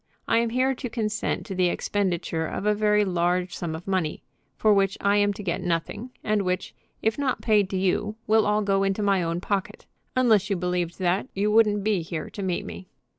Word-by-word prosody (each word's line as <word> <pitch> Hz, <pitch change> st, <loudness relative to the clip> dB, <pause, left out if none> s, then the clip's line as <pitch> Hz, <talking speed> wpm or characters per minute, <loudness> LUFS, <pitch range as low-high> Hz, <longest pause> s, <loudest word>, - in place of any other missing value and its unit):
I 230 Hz, -, +3 dB
am 235 Hz, 0 st, +1 dB
here 255 Hz, +3 st, +2 dB
to 250 Hz, -1 st, -5 dB
consent 215 Hz, -2 st, -2 dB
to 200 Hz, -, -5 dB
the 180 Hz, -1 st, +2 dB
expenditure 175 Hz, -4 st, -1 dB
of 200 Hz, -, -4 dB
a 210 Hz, -, +4 dB
very 210 Hz, 0 st, +3 dB
large 180 Hz, 0 st, 0 dB
sum 165 Hz, -2 st, -4 dB
of 165 Hz, +4 st, -9 dB
money, 185 Hz, -5 st, -1 dB, 0.3 s
for 215 Hz, -1 st, +4 dB
which 195 Hz, -1 st, +2 dB
I 200 Hz, +1 st, +2 dB
am 205 Hz, 0 st, +3 dB
to 205 Hz, -, -8 dB
get 175 Hz, -2 st, -2 dB
nothing, 180 Hz, +7 st, -2 dB
and 215 Hz, -1 st, +1 dB
which, 185 Hz, -1 st, -2 dB, 0.3 s
if 220 Hz, +4 st, +1 dB
not 275 Hz, -3 st, -1 dB
paid 210 Hz, -4 st, +3 dB
to 190 Hz, -, -2 dB
you, 195 Hz, +3 st, 0 dB
will 220 Hz, 0 st, +3 dB
all 210 Hz, 0 st, +2 dB
go 195 Hz, -1 st, +2 dB
into 195 Hz, +1 st, 0 dB
my 195 Hz, -2 st, +3 dB
own 170 Hz, +1 st, -2 dB
pocket; 195 Hz, 0 st, -3 dB, 0.3 s
unless 220 Hz, -5 st, +3 dB
you 200 Hz, -, +1 dB
believed 180 Hz, -1 st, -2 dB
that 185 Hz, +4 st, 0 dB
you 205 Hz, +2 st, +1 dB
wouldn't 210 Hz, -2 st, +4 dB
be 210 Hz, -4 st, +1 dB
here 160 Hz, -1 st, -5 dB
to 205 Hz, -, -6 dB
meet 185 Hz, -2 st, -2 dB
me." 185 Hz, -, -8 dB
200 Hz, 215 wpm, -25 LUFS, 180-210 Hz, 0.3 s, a